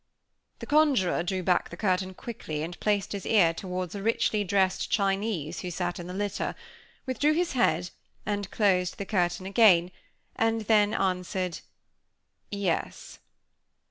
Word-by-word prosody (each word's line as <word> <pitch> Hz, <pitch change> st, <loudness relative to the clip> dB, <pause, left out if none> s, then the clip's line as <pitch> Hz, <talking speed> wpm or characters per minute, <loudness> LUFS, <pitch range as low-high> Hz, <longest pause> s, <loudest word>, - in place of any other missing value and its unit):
The -, -, -8 dB
conjuror 285 Hz, -, +3 dB
drew 185 Hz, +1 st, -2 dB
back 180 Hz, 0 st, +1 dB
the 170 Hz, -, -9 dB
curtain 185 Hz, -1 st, 0 dB
quickly, 155 Hz, -11 st, -5 dB
and 175 Hz, +2 st, -6 dB
placed 205 Hz, -2 st, 0 dB
his 200 Hz, -2 st, -4 dB
ear 180 Hz, -7 st, +4 dB
toward 180 Hz, 0 st, -5 dB
a 200 Hz, -, -5 dB
richly 215 Hz, -1 st, +1 dB
dressed 190 Hz, -1 st, +1 dB
Chinese, 195 Hz, -5 st, -1 dB
who 180 Hz, -, -5 dB
sat 175 Hz, 0 st, -3 dB
in 175 Hz, -, -7 dB
the 180 Hz, -, -6 dB
litter; 205 Hz, 0 st, -2 dB, 0.5 s
withdrew 290 Hz, +4 st, +1 dB
his 340 Hz, +2 st, 0 dB
head, 175 Hz, -8 st, +1 dB, 0.3 s
and 205 Hz, -1 st, -2 dB
closed 185 Hz, -5 st, +1 dB
the 200 Hz, -, -4 dB
curtain 180 Hz, -2 st, 0 dB
again; 190 Hz, -4 st, +5 dB, 0.4 s
and 225 Hz, 0 st, +1 dB
then 210 Hz, -1 st, +3 dB
answered: 185 Hz, -1 st, -1 dB, 0.9 s
"Yes." 200 Hz, -4 st, -3 dB
195 Hz, 140 wpm, -27 LUFS, 180-210 Hz, 0.9 s, again